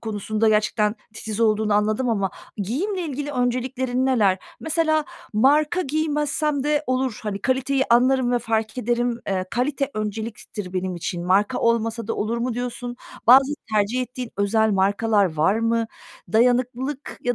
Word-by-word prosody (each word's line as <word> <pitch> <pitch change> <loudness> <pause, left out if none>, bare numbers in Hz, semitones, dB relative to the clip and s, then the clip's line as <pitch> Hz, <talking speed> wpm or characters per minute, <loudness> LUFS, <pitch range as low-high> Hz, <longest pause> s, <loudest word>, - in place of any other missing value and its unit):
konusunda 215 0 -1
gerçekten 210 0 +2 0.2
titiz 220 0 -5
olduğunu 215 -1 +2
anladım 215 +4 +1
ama 200 -4 0 0.3
giyimle 300 - -2
ilgili 290 -2 -4
önceliklerin 255 0 -1
neler? 205 -8 +3 0.2
Mesela 315 -1 +1 0.3
marka 295 +10 +3
giymezsem 300 -2 -1
de 295 0 +1
olur, 255 -2 -1
hani, 210 -2 -3
kaliteyi 265 +1 +1
anlarım 255 +1 +4
ve 245 - +3
fark 225 +1 -2
ederim. 240 0 0
Eee, 185 -1 0
kalite 275 +3 -1
önceliktir 215 -2 -5
benim 185 -1 -2
için. 175 0 -4
Marka 205 +7 +2
olmasa 230 -1 0
da - - -2
olur 225 +3 -2
mu 240 0 -2
diyorsun? 245 0 -4 0.3
Bazı 265 +4 +7 0.2
tercih 215 +4 +1
ettiğin 250 -1 -6
özel 220 +2 +2
markalar 200 -1 +2
var 160 +6 +3
mı? 230 0 +1 0.5
Dayanıklılık 250 +4 +1
ya 245 0 0
235 Hz, 140 wpm, -23 LUFS, 215-260 Hz, 0.5 s, Bazı